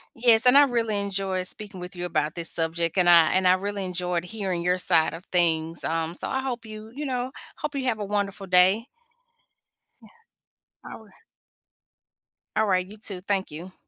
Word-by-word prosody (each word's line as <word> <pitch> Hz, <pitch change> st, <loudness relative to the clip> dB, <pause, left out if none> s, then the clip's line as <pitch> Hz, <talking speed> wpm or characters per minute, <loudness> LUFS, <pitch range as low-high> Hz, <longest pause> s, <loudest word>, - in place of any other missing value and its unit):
Yes, 230 Hz, -1 st, +4 dB
and 250 Hz, +1 st, +6 dB
I 285 Hz, 0 st, +8 dB
really 230 Hz, -5 st, -1 dB
enjoyed 195 Hz, -2 st, -2 dB
speaking 205 Hz, -2 st, -5 dB
with 180 Hz, +1 st, -8 dB
you 175 Hz, 0 st, -5 dB
about 155 Hz, -3 st, -1 dB
this 170 Hz, -1 st, 0 dB
subject, 165 Hz, +2 st, 0 dB
and 175 Hz, -1 st, +4 dB
I 170 Hz, -2 st, +7 dB
and 185 Hz, 0 st, +3 dB
I 180 Hz, -, +6 dB
really 200 Hz, +1 st, -3 dB
enjoyed 180 Hz, -1 st, -3 dB
hearing 190 Hz, -3 st, -4 dB
your 180 Hz, +1 st, +1 dB
side 170 Hz, -3 st, +2 dB
of 175 Hz, +4 st, -12 dB
things. 165 Hz, -2 st, +1 dB
Um, 165 Hz, 0 st, -2 dB
so -, -, -3 dB
I 265 Hz, -, -1 dB
hope 250 Hz, -3 st, -4 dB
you, 215 Hz, 0 st, -10 dB
you 295 Hz, +3 st, -5 dB
know, 255 Hz, -1 st, -3 dB, 0.3 s
hope 300 Hz, 0 st, -5 dB
you 275 Hz, -2 st, -3 dB
have 240 Hz, -4 st, 0 dB
a 205 Hz, -, -3 dB
wonderful 200 Hz, -1 st, -3 dB
day. 185 Hz, +4 st, +4 dB, 1.2 s
Yeah, -, -, -17 dB, 0.8 s
all -, -, -11 dB
r -, -, -21 dB, 1.5 s
All 220 Hz, 0 st, +2 dB
right, 185 Hz, -2 st, +1 dB
you 205 Hz, +3 st, -13 dB
too. 200 Hz, -3 st, -5 dB
Thank 195 Hz, -1 st, -2 dB
you 170 Hz, +5 st, -9 dB
190 Hz, 190 wpm, -25 LUFS, 175-215 Hz, 1.5 s, I